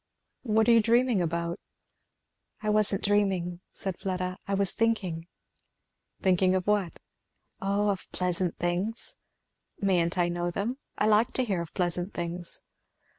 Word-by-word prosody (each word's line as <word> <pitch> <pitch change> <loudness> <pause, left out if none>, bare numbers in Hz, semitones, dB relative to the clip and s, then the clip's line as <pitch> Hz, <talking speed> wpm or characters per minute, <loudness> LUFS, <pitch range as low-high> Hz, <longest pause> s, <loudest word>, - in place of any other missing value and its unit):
"What 220 -2 +2
are - - +7
you 230 -1 +7
dreaming 235 -1 +3
about?" 170 0 -2 1.0
"I 215 -1 0
wasn't 210 -2 +3
dreaming," 190 -4 +1
said 190 -2 -5
Fleda, 185 -1 -3
"I 200 - +1
was 195 -2 +2
thinking." 190 -8 0 1.0
"Thinking 185 0 +4
of 185 -1 0
what?" 205 -5 +1 0.6
"O 200 +2 +1
of 195 - -6
pleasant 180 -1 -1
things." 180 +6 -2 0.6
"Mayn't 180 -3 +1
I 175 -1 +3
know 175 0 -1
them? 220 +9 -2 0.2
I - - +2
like 215 +3 +4
to 255 - 0
hear 195 -6 0
of 170 - -8
pleasant 175 +1 -1
things." 175 0 -5
190 Hz, 140 wpm, -28 LUFS, 175-210 Hz, 1.0 s, are